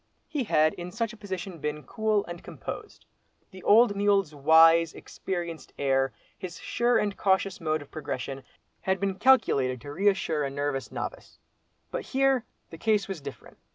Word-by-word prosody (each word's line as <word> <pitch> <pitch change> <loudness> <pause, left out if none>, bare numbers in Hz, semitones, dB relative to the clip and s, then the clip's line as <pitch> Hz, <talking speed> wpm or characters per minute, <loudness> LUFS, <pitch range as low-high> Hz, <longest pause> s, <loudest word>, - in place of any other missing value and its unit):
He 290 -6 -2
had 155 -5 +3
in 175 0 -7
such 230 +2 -2
a - - -10
position 190 -4 -6
been 150 0 -3
cool 215 +6 0
and 175 0 -8
composed. - - -8 0.5
The 190 -1 -11
old 220 +1 +5
mule's 200 -5 +2
wise, 160 +3 +6
experienced 170 -3 -6
air, 135 -1 +1 0.2
his 180 -2 -7
sure 240 0 +1
and 205 -1 0
cautious 190 -1 +1
mode 155 -2 -1
of 145 - -21
progression, 135 -3 -5 0.4
had 190 0 0
been 195 0 -2
calculated 140 - +4
to 145 +3 -8
reassure 190 -4 +1
a 140 - -1
nervous 140 -1 -3
novice. - - -6 0.5
But - - -2
here, 270 -3 +1 0.3
the 165 - -10
case 210 -2 +2
was 190 -6 -5
different. 140 -5 -10
175 Hz, 160 wpm, -27 LUFS, 150-205 Hz, 0.5 s, wise